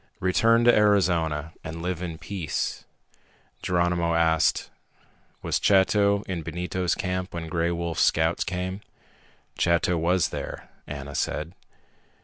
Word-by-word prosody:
"Return 115 +5 +3
to 120 0 +6
Arizona 85 -7 +2
and 80 +1 -6
live 90 -1 -2
in 85 -3 -5
peace." 90 -4 -4 0.8
Geronimo 85 -1 +1
asked, 80 -1 +2 0.7
"Was - - 0
Chato 100 +1 +3
in 90 -4 -4
Benito's 90 +2 -2
camp 90 -1 -3
when 85 -1 -4
Gray 85 0 0
Wolf's 85 -1 -2
scouts 80 +1 +2
came?" 95 +2 -4 0.8
"Chato 85 0 +2
was 90 +2 +2
there," - - -7 0.2
Ana 70 -1 -7
said. 80 +3 -2
85 Hz, 120 wpm, -25 LUFS, 80-95 Hz, 0.8 s, to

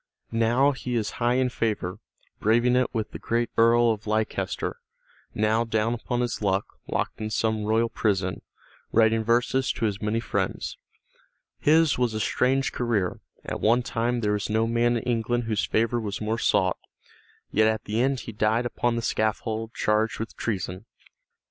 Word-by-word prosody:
Now 120 +5 +3
he 125 -2 -4
is 110 -3 -1
high 120 +1 +3
in 130 0 +2
favor, 105 -7 -2 0.4
braving 120 +3 +3
it 125 0 +2
with 110 -3 -3
the - - -7
great 120 0 -1
Earl 115 +1 +5
of 110 -1 -5
Leicester, 110 +1 -1 0.6
now 110 +2 +2
down 110 0 0
upon 120 +1 -2
his 120 -2 -2
luck, 100 -1 +1 0.2
locked - - -2
in 110 - -2
some 110 -1 0
royal 110 +2 +2
prison, 100 -5 -1 0.5
writing 110 0 +3
verses 125 +3 +2
to 115 - -2
his 105 -2 -2
many 105 +1 0
friends. 115 - -2 0.8
His 155 -2 +4
was 120 -3 +1
a - - -1
strange 130 +5 +1
career; 110 -7 -1 0.3
at - - -4
one 120 +3 +3
time 120 +1 -1
there 105 -1 +1
was 105 0 -2
no 110 +1 +2
man 120 +1 +2
in 115 - -4
England 120 0 0
whose 110 -2 0
favor 115 +2 +1
was 105 0 -4
more 110 +1 -1
sought, 95 -5 +2 0.7
yet 110 +1 +4
at 110 0 0
the 110 +3 -1
end 135 0 +1
he - - -7
died 110 +3 +1
upon 120 0 0
the 115 - -2
scaffold 110 +1 -1
charged 110 +1 +1
with 115 - -5
treason. 95 -1 -3
115 Hz, 170 wpm, -26 LUFS, 110-120 Hz, 0.8 s, Earl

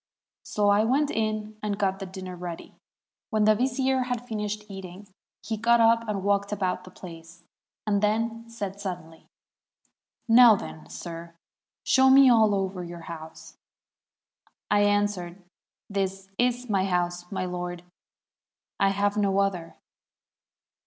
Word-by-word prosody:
So 205 -1 0
I 205 +1 +4
went 275 +6 +2
in 215 -1 -2
and 205 -1 -2
got 195 -1 0
the 195 - -6
dinner 185 -1 -7
ready. 175 -1 -7 0.6
When 215 -3 +1
the 215 +1 +6
vizier 260 +2 0
had 245 -1 -3
finished 210 -1 -4
eating, 195 0 -9 0.4
he 220 +1 -3
got 235 +2 +3
up 230 0 +4
and 200 -3 -2
walked 200 0 +1
about 185 -3 -2
the - - -11
place, 170 -1 -12 0.4
and 205 -2 +1
then 230 +2 -1
said 200 -3 -6
suddenly, 175 -4 -7 1.0
'Now, 235 -1 +8
then, 80 - -8
sir, 165 - -8 0.5
show 265 0 +5
me 265 -1 +8
all 220 -3 +4
over 190 -2 -2
your 170 0 -8
house.' 160 -1 -10 1.1
I 205 0 +4
answered, 205 -3 0 0.5
'This 195 -1 -3
is 245 0 +1
my 195 -3 +1
house, 175 -1 -2
my 190 -2 -2
lord; 180 -1 -5 1.0
I 195 - +4
have 205 +1 0
no 200 -2 +1
other.' 190 -4 -1
200 Hz, 140 wpm, -26 LUFS, 180-220 Hz, 1.1 s, Now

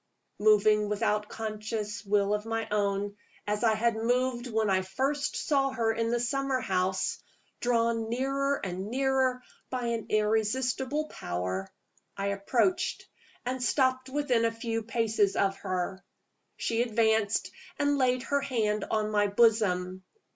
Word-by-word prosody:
Moving 210 0 +4
without 210 0 0
conscious 215 -1 -4
will 200 0 +2
of 210 0 -1
my 225 0 -2
own, 200 -1 0 0.3
as 210 +1 -1
I 220 -2 +4
had 230 +1 +1
moved 245 +2 0
when 220 -2 0
I 190 -1 +3
first 270 +10 -1
saw 275 -2 +1
her 230 -4 0
in 230 0 -1
the 240 +1 +1
summer 270 +2 0
house 185 -3 0 0.4
drawn 230 -2 +1
nearer 275 +3 0
and 185 +1 -4
nearer 260 0 +1 0.3
by 250 -2 -3
an 230 -2 -2
irresistible 250 +7 +1
power 90 +2 -4 0.5
I 200 0 -1
approached 230 - 0 0.4
and 255 +1 -2
stopped 260 0 +1
within 260 -4 +1
a 230 - +2
few 225 0 -3
paces 220 -3 +1
of 195 0 +1
her. 185 +1 -3 0.5
She 230 0 0
advanced 220 -3 +1 0.3
and 285 0 +1
laid 255 -1 +2
her 280 +1 0
hand 220 -6 0
on 215 -1 0
my 205 -1 +3
bosom. 195 -4 +2
225 Hz, 140 wpm, -29 LUFS, 210-255 Hz, 0.5 s, Moving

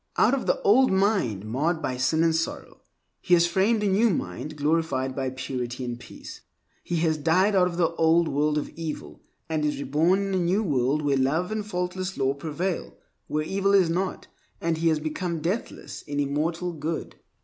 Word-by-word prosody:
Out - - +4
of 275 - -1
the - - +2
old 255 +6 +5
mind 190 - +1
marred 150 +10 0
by 130 -5 -2
sin 130 +6 +1
and 165 -1 +3
sorrow, 165 0 -4 0.4
he 180 - +4
has 170 0 +4
framed 200 +5 +2
a - - +2
new 205 +4 +3
mind 155 - -3
glorified 145 -3 0
by 135 -1 -1
purity 125 -1 -4
and 120 -1 -5
peace. 120 - -11 0.4
He 175 - -3
has 160 -2 +2
died 180 +7 +3
out 185 -2 +4
of 170 -1 -5
the 170 -2 +2
old 165 +1 +4
world 150 +1 +1
of 150 - -2
evil, 160 -2 -7 0.3
and 155 -2 -1
is 150 0 0
reborn 150 +7 +2
in - - -2
a - - +2
new 180 +5 +1
world 140 - +1
where 140 -2 +2
love 155 +9 +1
and 215 -1 -2
faultless 185 -1 -3
law 135 0 +1
prevail, 160 +5 -4 0.3
where 155 0 -1
evil 195 +4 +1
is 180 -4 +4
not, 185 +2 -2 0.3
and 165 -1 -1
he 165 - +1
has 160 -2 +3
become 165 +2 -3
deathless 180 +9 -4
in 145 -1 -4
immortal 160 +5 -1
Good. 160 +1 -4
160 Hz, 195 wpm, -26 LUFS, 145-185 Hz, 0.4 s, old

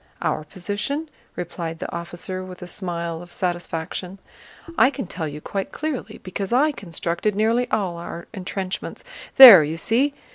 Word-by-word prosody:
"Our 155 - 0
position?" 210 - -4 0.2
replied 170 -1 -5
the 175 - -6
officer 175 +2 -5
with 185 -1 -9
a - - -8
smile 170 -3 -4
of 175 0 -13
satisfaction. 175 +1 -3 0.6
"I 265 - +6
can 275 -4 -5
tell 165 -2 -4
you 150 +1 -7
quite 195 +3 -4
clearly, 305 -4 -4
because 190 +1 -5
I 285 +6 +4
constructed 180 - -3
nearly 230 +4 +1
all 185 -5 -1
our 170 0 -7
entrenchments. 190 -1 -5 0.3
There, 230 -11 +12
you 155 +2 -3
see? 265 - +1
185 Hz, 150 wpm, -23 LUFS, 170-220 Hz, 0.6 s, There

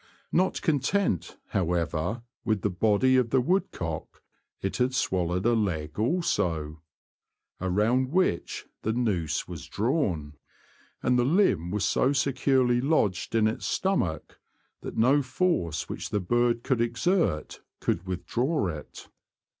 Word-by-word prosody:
Not 185 +2 +1
content, 155 - 0
however, 90 +4 -1 0.2
with 110 -4 0
the 105 - +1
body 110 +7 +3
of 125 -2 +2
the 130 - +3
woodcock, 105 - -2 0.4
it 95 - -3
had 130 +1 +1
swallowed 90 -3 0
a 120 - +4
leg 85 -7 -1
also, 85 - 0 0.8
around 110 +8 +1
which 180 - 0 0.2
the 110 - -1
nooze 105 -10 -1
was - - -8
drawn, 100 - -1 0.7
and 125 0 +3
the - - +4
limb 130 - +2
was 100 +1 0
so 135 - +2
securely 130 -2 +2
lodged 120 - +1
in 110 -1 +4
its 110 - -3
stomach 95 - -1 0.4
that - - -7
no 130 +6 +4
force 130 - -1
which - - -5
the 105 - 0
bird 120 +4 +1
could 130 -4 +1
exert 120 - 0 0.2
could 90 +3 -1
withdraw 100 - -1
it. 75 -3 -8
115 Hz, 130 wpm, -27 LUFS, 90-130 Hz, 0.8 s, a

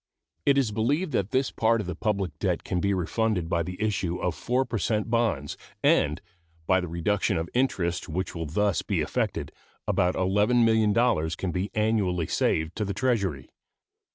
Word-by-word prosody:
It 140 -1 +5
is 130 -6 +2
believed 145 - 0
that 100 -6 0
this 130 +3 +1
part 115 0 +2
of 105 - -3
the 90 - -3
public 95 -3 -2
debt - - 0
can 90 - -1
be 100 +3 +1
refunded 95 0 0
by 85 0 0
the 90 +2 -5
issue 100 -5 -1
of 90 - -1
4 125 +6 0
per 115 -3 -3
cent 110 +1 -1
bonds, 110 - 0 0.3
and, 75 +3 +3 0.5
by 95 +2 +3
the 90 - -4
reduction 85 +5 0
of 80 +1 -2
interest 95 -10 0
which 90 +4 -3
will 80 -2 -4
thus 100 +4 +1
be - - -1
effected, - - -2 0.4
about 90 +1 +2
$11,000,000 105 -2 +2
can 95 - -2
be 95 +4 -2
annually 105 -6 +1
saved 80 +2 0
to 110 - 0
the 100 -1 -3
Treasury. 100 - -1
100 Hz, 175 wpm, -26 LUFS, 90-115 Hz, 0.5 s, It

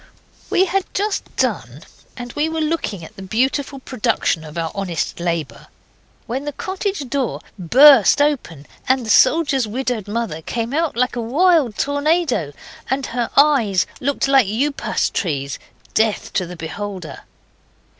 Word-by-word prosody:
We 375 - +3
had 385 +1 -2
just 410 +1 -1
done, - - -2 0.3
and 245 -1 -7
we 300 +2 0
were 320 0 -3
looking 305 - -2
at - - -14
the - - -10
beautiful 265 +8 -1
production 235 -10 -1
of 155 +1 -10
our 165 -1 -2
honest 190 -5 -3
labour, 165 -8 -3 0.6
when 260 +5 -4
the 295 - -2
cottage 380 -3 -3
door 270 -1 -2 0.2
burst 260 - +7
open, 270 - 0 0.2
and 260 -2 +2
the 220 - 0
soldier's 275 -3 +4
widowed 245 -2 -3
mother 205 -7 -3
came 230 - -3
out 320 -4 0
like 250 0 +1
a 240 - -2
wild 285 - +2
tornado, 285 - 0 0.4
and 265 +1 -1
her 240 -1 -1
eyes 260 -10 +4
looked 280 +1 0
like 270 -5 +4
upas 270 +8 -1
trees 140 -6 -2 0.3
death 220 -1 0
to 185 - 0
the 180 - -8
beholder. 180 -1 -6
250 Hz, 145 wpm, -20 LUFS, 195-290 Hz, 0.6 s, burst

